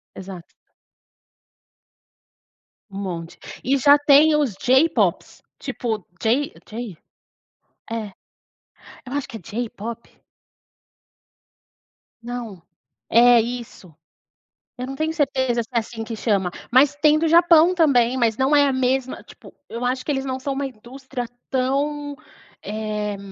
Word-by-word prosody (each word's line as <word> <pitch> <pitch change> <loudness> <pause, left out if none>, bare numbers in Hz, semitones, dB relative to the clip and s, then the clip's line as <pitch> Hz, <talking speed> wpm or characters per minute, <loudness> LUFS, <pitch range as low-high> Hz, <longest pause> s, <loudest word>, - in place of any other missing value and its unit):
Exato. 185 -2 -10 2.4
Um 195 - -6
monte, 170 -3 -6 0.2
e 270 +3 +2
já 285 +3 +7
tem 290 +1 +5
os 290 -8 +1
J-pops, 265 +10 +1 0.2
tipo 220 -6 -3 0.2
J 275 - +1 0.2
J 220 -4 -6 0.9
é, 225 -2 -4 1.0
eu 255 - -8
acho 285 -1 -2
que 225 - -8
é - - -16
J-pop. 230 +3 -6 2.1
Não, 235 -6 -7 0.5
é 240 +1 +6
isso, 230 -8 -6 0.8
eu 250 - -4
não 270 - -6
tenho 315 +2 -1
certeza 260 -6 0
se 220 - -15
é - - +4
assim 225 0 -7
que 225 0 -6
chama, 200 -5 0 0.2
mas 275 +3 +5
tem 300 +1 +4
o - - -3
do 325 - +1
Japão 335 +1 +6
também, 260 -8 +3
mas 230 -3 +1
não 270 +3 +3
é 285 0 +5
a 275 - +1
mesma, 260 0 -1
tipo, - - -16
eu 235 +2 -5
acho 255 +1 -1
que - - -4
eles 270 -2 -1
não 260 -1 -3
são 275 +1 -3
uma 280 +1 -2
indústria 255 0 -7 0.2
tão, 285 +3 -1 0.5
eh 210 -1 -3
250 Hz, 130 wpm, -22 LUFS, 225-285 Hz, 2.4 s, já